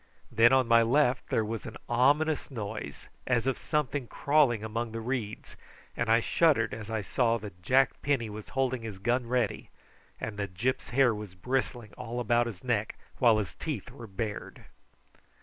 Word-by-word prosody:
Then 115 +2 +6
on 130 -2 +4
my 115 0 +6
left 125 +2 +2
there 110 - +1
was 110 0 -5
an - - -8
ominous 145 +6 +2
noise, 105 - -6 0.2
as 120 -2 +2
of 135 -1 0
something 145 -3 -1
crawling 140 -7 +2
amongst 110 +1 -3
the 115 - -3
reeds, 115 -2 -4 0.4
and 120 -1 -1
I 115 +1 +5
shuddered 125 -6 +2
as 110 -1 -7
I 110 -1 -1
saw 115 +4 +1
that 100 -5 -10
Jack 135 +9 +2
Penny 135 -5 0
was 105 0 -8
holding 130 -2 +1
his 110 -4 -6
gun 120 +5 0
ready, 120 -3 -1 0.5
and 110 -2 -5
that 100 -3 -4
Gyp's 130 +8 -1
hair 130 -2 +4
was 105 -3 -8
bristling 120 0 -2
all 120 +2 -4
about 120 0 +2
his 100 -6 -8
neck, 110 -4 -1 0.2
while 115 -4 +5
his 100 -8 -3
teeth - - -5
were 115 - -10
bared. 105 +1 -5
115 Hz, 175 wpm, -29 LUFS, 110-130 Hz, 0.5 s, Then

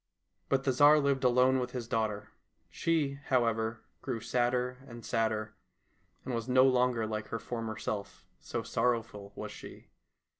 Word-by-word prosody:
But 135 -1 +2
the 135 - +2
Tsar 145 +4 +6
lived 140 -2 +1
alone 125 +1 +4
with 125 -1 -4
his 120 -3 -4
daughter. 110 -3 -2 0.4
She, 150 -4 0
however, 115 -3 +1 0.2
grew 125 -4 -3
sadder 125 +2 0
and 120 -2 -10
sadder, 110 -2 -1 0.7
and 130 - -3
was 115 +1 -3
no 130 +1 +6
longer 125 -3 +2
like 110 -1 -4
her 115 - -3
former 115 -1 -5
self, 100 -2 -5
so - - -4
sorrowful 115 -4 -1
was - - -6
she. - - -11
120 Hz, 150 wpm, -31 LUFS, 110-130 Hz, 0.7 s, Tsar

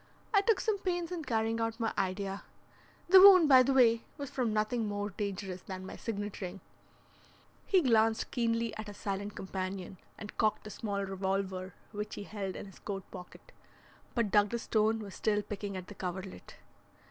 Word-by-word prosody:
I 400 - +6
took 435 +1 +2
some 430 -3 0
pains 350 -2 -2
in 345 -3 -4
carrying 225 -1 0
out 225 +1 -2
my 225 -1 0
idea. 195 0 -2 0.7
The 380 +2 +9
wound, 370 -4 +9
by 260 -3 +8
the 260 +2 +2
way, 230 -4 +5
was 285 -2 -6
from 250 -5 0
nothing 215 +1 0
more 205 0 -3
dangerous 195 -2 -4
than 185 -1 -7
my - - -7
signet 205 -2 -5
ring." 185 +1 -5 1.1
He 375 -3 +4
glanced 225 -3 +3
keenly 230 -2 0
at 215 0 -6
his 205 -1 -9
silent 200 +1 -4
companion, 190 -1 -5 0.2
and 210 - -9
cocked 215 -1 +2
the 215 - -8
small 200 -2 -3
revolver 190 -1 -3 0.2
which 210 0 -5
he - - -6
held 195 -2 -5
in - - -6
his 195 - -14
coat 195 -2 -5
pocket. 180 - -11 0.6
But 230 -5 +1
Douglas 210 +3 +2
Stone 220 0 +1
was 200 -3 -8
still 210 -1 0
picking 200 -1 -5
at 185 - -6
the 205 - -10
coverlet. 185 0 -6
210 Hz, 180 wpm, -32 LUFS, 195-230 Hz, 1.1 s, The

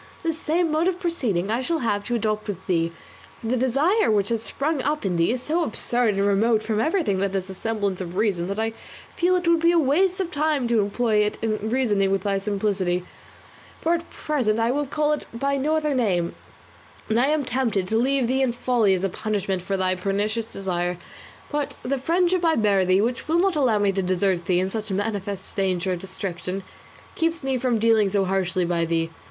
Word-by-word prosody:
This 325 -1 -1
same 330 +1 +1
mode 315 +3 +2
of 365 -1 0
proceeding 230 - -1
I 235 +3 0
shall 330 +6 0
have 205 -2 0
to 240 - -1
adopt 215 -1 -1
with 205 -4 -5
thee, 165 -2 +1 0.5
for - - -11
the 255 - +2
desire 275 - +2
which 205 -2 +2
has 230 -2 0
sprung 280 +5 -2
up 295 -2 -1
in 185 -2 0
thee 170 +4 +2
is 250 +1 -3
so 335 +3 0
absurd 240 -4 0
and 195 0 +1
remote 215 +2 +2
from 215 -1 -1
everything 310 - +1
that 195 0 -1
has 190 0 -3
a - - -6
semblance 200 -2 -2
of 175 -1 -6
reason, 190 -4 0
that 200 +1 -3
I 225 0 -1 0.4
feel 360 +1 +2
it 355 -1 -1
would 335 -1 +4
be 335 +1 +4
a 345 - +3
waste 350 +6 +2
of 365 -2 -2
time 295 -4 +1
to 235 -2 +3
employ 215 +2 0
it 210 0 +1
in 215 -1 -1
reasoning 215 -6 +2
with 195 0 0
thy 200 -1 0
simplicity, 195 -3 -1 0.7
for 335 - +1
at 335 0 -3
present 245 -8 -1
I 230 +1 +2
will 290 +2 -1
call 300 +2 +1
it 300 - -4
by 275 +3 0
no 300 +4 +1
other 305 -2 0
name; 190 -9 +1 0.7
and 220 +1 +2
I 255 - +3
am 305 0 +2
even - - -6
tempted 230 -7 0
to 220 - 0
leave 265 +2 +2
thee 260 +3 +1
in 265 - +2
thy 240 - -5
folly 235 -6 +2
as 185 - -3
a 195 - +1
punishment 200 -3 -2
for 195 +2 -2
thy 185 0 +1
pernicious 205 +4 -2
desire; 180 -2 -2 0.5
but 295 -1 -2
the 270 +2 -1
friendship 350 +5 +1
I 325 -1 +3
bear 200 -5 +3
thee, 185 +2 +3
which 240 +4 -2
will 325 +2 +2
not 380 -1 +2
allow 255 -7 +3
me 205 -1 +2
to 195 0 -1
desert 185 -1 0
thee 180 -1 +3
in 190 +1 -1
such 220 0 -4
manifest 200 -1 -3
danger 185 -2 0
of 180 - -4
destruction, 190 0 -5 0.5
keeps 330 -2 0
me 265 -1 0
from 245 -2 +1
dealing 220 -2 +3
so 195 0 +1
harshly 185 -1 0
by 170 -1 0
thee. 165 0 -1
220 Hz, 225 wpm, -24 LUFS, 195-275 Hz, 0.7 s, would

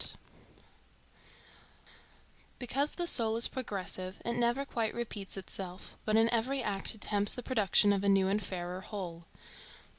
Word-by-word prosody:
ART - - +3 2.4
Because 275 +4 -1
the 350 - -2
soul 225 -9 +5
is 230 - +5
progressive, 190 -6 -4
it 235 - -1
never 240 +3 0
quite 230 -5 -2
repeats 210 -5 -4
itself, 185 -1 -7
but 215 - +1
in 225 +1 +5
every 255 +3 0
act 195 +1 +1
attempts 205 -1 +2
the 250 - -6
production 210 -4 +3
of 200 0 -1
a 200 - +2
new 195 -1 +3
and 200 +2 0
fairer 180 -1 -5
whole. 175 -5 -7
210 Hz, 145 wpm, -31 LUFS, 195-235 Hz, 2.4 s, soul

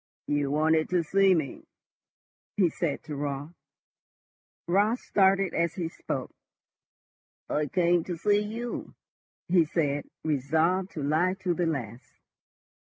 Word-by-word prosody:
"You 145 -1 0
wanted 155 +2 +2
to 180 -1 +2
see 195 +3 +4
me?" 155 -5 -4 0.9
he 185 -4 +4
said 155 -3 -2
to 155 -2 -6
Raut. 145 +2 -4 1.1
Raut 205 +6 +3
started 195 -4 +2
as 170 -1 0
he 170 -3 -2
spoke. - - -5 1.1
"I 150 0 0
came 175 0 +2
to 175 -2 -4
see 205 +4 +3
you," 230 +3 -5 0.5
he 175 -1 +5
said, 145 -3 -1
resolved 160 +6 +1
to 150 - -4
lie 160 +6 +2
to 180 -2 +1
the 170 0 0
last. 125 -6 -5
165 Hz, 125 wpm, -28 LUFS, 150-185 Hz, 1.1 s, he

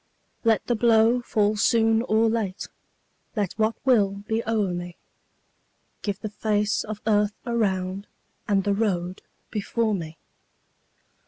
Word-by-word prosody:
Let 225 -2 +2
the 240 - +1
blow 230 +1 +4
fall 215 -3 +1
soon 225 0 +3
or 225 -1 +2
late, 220 -4 -2 0.7
Let 205 -5 -1
what 220 0 +1
will 200 -6 +3
be 225 0 0
o'er 210 -5 +1
me; 175 0 -6 1.1
Give 205 -1 -3
the 215 - -5
face 210 -1 0
of 215 -1 -6
earth 210 -1 +2
around 195 -4 -1 0.4
And 195 -2 +2
the 200 - +1
road 185 -3 -1 0.3
before 220 +1 -1
me. 165 -4 -5
210 Hz, 130 wpm, -25 LUFS, 195-225 Hz, 1.1 s, blow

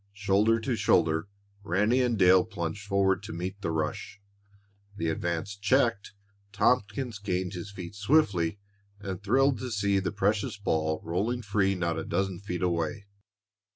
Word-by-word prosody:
Shoulder 105 +3 +2
to 120 +2 -1
shoulder, 80 -5 +2 0.4
Ranny 105 +7 +2
and 120 -3 +1
Dale 90 -1 +6
plunged 100 -1 -5
forward 100 -1 +2
to 105 +2 -8
meet 95 +4 -5
the - - -2
rush. 80 +5 -3 0.8
The 85 -5 -1
advance 85 +4 -2
checked, 110 0 +1 0.4
Tompkins 110 +1 0
gained 95 -2 -2
his 90 +2 -6
feet 90 -3 -8
swiftly 100 - +2 0.4
and 100 -2 -5
thrilled 130 +4 +2
to 125 - -4
see 100 -3 +1
the 95 - -2
precious 100 0 0
ball 80 -5 -1
rolling 110 +9 -1
free 100 -1 +1
not 85 -2 -1
a - - -4
dozen 95 +1 -2
feet 95 -2 -4
away. 85 +3 -1
100 Hz, 150 wpm, -28 LUFS, 90-105 Hz, 0.8 s, Dale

